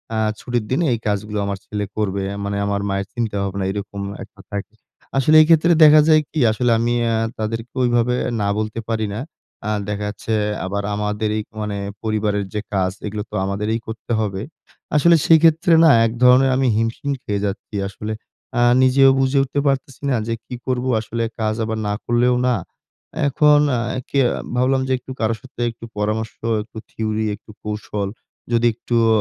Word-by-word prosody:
,"আ - - 0 0.2
ছুটির 120 -3 -2
দিনে 165 +6 +2
এই 115 - -2
কাজগুলো 105 +1 -2
আমার 100 0 -2
ছেলে 105 -1 -3
করবে।" 100 -2 -1 0.2
মানে 100 0 -2
আমার 100 0 -1
মায়ের 100 0 -2
চিন্তাভাবনা 100 -4 -2
এরকম 100 0 -5 0.2
একটা 100 -1 -15
থাকে। 100 +1 -5 0.4
আসলে 155 +4 +4
এইক্ষেত্রে 165 +2 +5
দেখা 150 0 +8
যায় 155 -1 +6
কি? 155 - -3
আসলে 120 +2 +1
আমি 120 +1 +1
অ্যা 115 -1 +1 0.2
তাদেরকে 115 +2 -4
ওইভাবে 120 0 +2 0.3
না 100 - 0
বলতে 110 +1 -3
পারি 110 -1 0
না। - - -4 0.5
আ - - +1 0.2
দেখাচ্ছে 105 +2 -3 0.3
আবার 100 +1 -2
আমাদেরই 105 +1 -1 0.2
মানে 105 -1 -3 0.3
পরিবারের 105 -2 0
যে 105 - -2
কাজ 95 -2 +1 0.2
এগুলো 105 0 -4
তো - - -6
আমাদেরই 105 +3 -1
করতে 110 +1 -7
হবে। 100 -3 -2 0.5
আসলে 170 +3 +6
সেক্ষেত্রে 165 +1 +5
না 160 - +7 0.2
এক 110 - 0
ধরনের 125 +2 +6
আমি 135 -1 +2
হিমশিম 115 +5 -1
খেয়ে 100 -1 -2
যাচ্ছি। 100 +1 -5
আসলে 105 +2 -5 0.5
আ - - +3 0.2
নিজেও 135 +1 +6
বুঝে 135 +1 +2
উঠতে 140 +1 -2
পারতেছি 135 -1 -1
না 130 - +2
যে 115 - -1
কি 125 - -7
করব? 125 0 -1 0.2
আসলে 115 +1 -3 0.2
কাজ 110 0 0
আবার 110 0 -3
না 105 - 0
করলেও 120 +1 +2
না। 125 - +3 0.7
এখন 150 +1 +5
অ্যা 120 +1 -1
কে 140 - +1 0.4
ভাবলাম 130 +2 +2
যে - - -2
একটু 130 - -11
কারো 110 0 +1
সাথে 130 -2 -10
একটু 115 0 -11
পরামর্শ, 110 +1 -1 0.3
একটু 110 - -15
থিওরি, 110 0 -2
একটু 105 - -16
কৌশল, 105 -1 -3 0.4
যদি 120 0 +2
একটুও 115 0 0
110 Hz, 170 wpm, -20 LUFS, 105-125 Hz, 0.7 s, দেখা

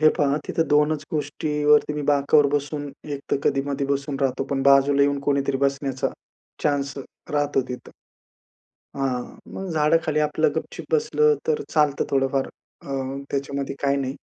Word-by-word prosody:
हे 155 - +7
पहा 140 0 +2
तिथं 165 - 0
दोनच 150 0 +3
गोष्टीवरती 150 0 +1
मी 150 - -3
बाकावर 145 +1 +4
बसून 145 0 -2 0.3
एक 140 - -6
तर - - +3
कधी-मधी 140 0 0
बसून 140 0 -1
राहतो, 135 0 0
पण 135 -1 0
बाजूला 140 +1 +5
येऊन 140 0 +2
कोणीतरी 140 -1 +1
बसण्याचा 135 -1 -2 0.5
चान्स 140 -1 0 0.4
राहतो 145 -2 +1
तिथं. 125 - -7 1.1
हां, 130 -2 -1 0.3
मग 190 0 -5
झाड 150 0 +3
खाली 155 -1 0
आपलं 150 +1 +2
गप-चुप - - -5
बसलं 455 0 +3
तर 450 -2 +1
चालतं 150 -2 +3
थोडंफार 135 0 +1 0.4
अ, - - -11 0.4
त्याच्यामध्ये 140 0 -3
काही 140 0 +2
नाही. 135 -1 -2
140 Hz, 150 wpm, -24 LUFS, 140-150 Hz, 1.1 s, हे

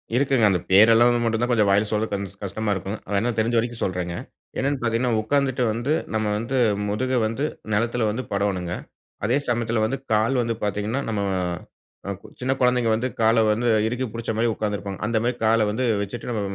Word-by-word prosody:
இருக்குங்க. 130 -3 +3
அந்த 90 - +1
பேரெல்லாம் 115 +5 +7
வந்து 120 -1 +1
மட்டுந்தான் 115 +2 0
கொஞ்சம் 105 -4 +3
வாயில 105 +2 +3
சொல்றதுக்கு 110 -1 0
கொஞ்சம் 100 0 -6
கஷ்டமா 105 +2 -2
இருக்கும். 95 +3 -4 0.2
வேணா 105 +4 +1
தெரிஞ்ச 115 +2 +1
வரைக்கும் 120 0 -1
சொல்றேங்க. 90 -2 -2 0.4
என்னென்னு 140 +1 0
பாத்தீங்கன்னா 120 +1 +1
உக்காந்துட்டு 130 +2 +1
வந்து, 120 +7 -1 0.2
நம்ம 110 0 0
வந்து 115 +5 -2 0.3
முதுக 130 +5 -1 0.2
வந்து 115 +7 -2 0.3
நிலத்துல 115 +1 +1
வந்து 120 +5 -3
படோணுங்க. 95 -3 -1 0.5
அதே 120 +6 +2
சமயத்துல 120 -2 0
வந்து, 135 +5 -1 0.2
கால் 110 +5 +2
வந்து 115 -1 -1
பாத்தீங்கன்னா, 105 +6 -1
நம்ம 105 -2 -1 0.9
அ, - - -1
கு - - -13
சின்ன 130 +1 0
குழந்தைங்க 125 -2 +3
வந்து 115 +3 0
கால 115 0 +4
வந்து 115 +3 +1 0.2
இறுக்கி 125 +3 -2
புடிச்ச 115 -1 -3
மாரி 115 - +2
உக்காந்திருப்பாங்க. 105 -2 -4
அந்த 115 +1 0
மாரி 120 +1 0
கால 110 +1 +4
வந்து 110 +5 -1 0.2
வச்சுட்டு, 105 +5 -5
நம்ம 115 -3 -1
115 Hz, 180 wpm, -23 LUFS, 105-120 Hz, 0.9 s, பேரெல்லாம்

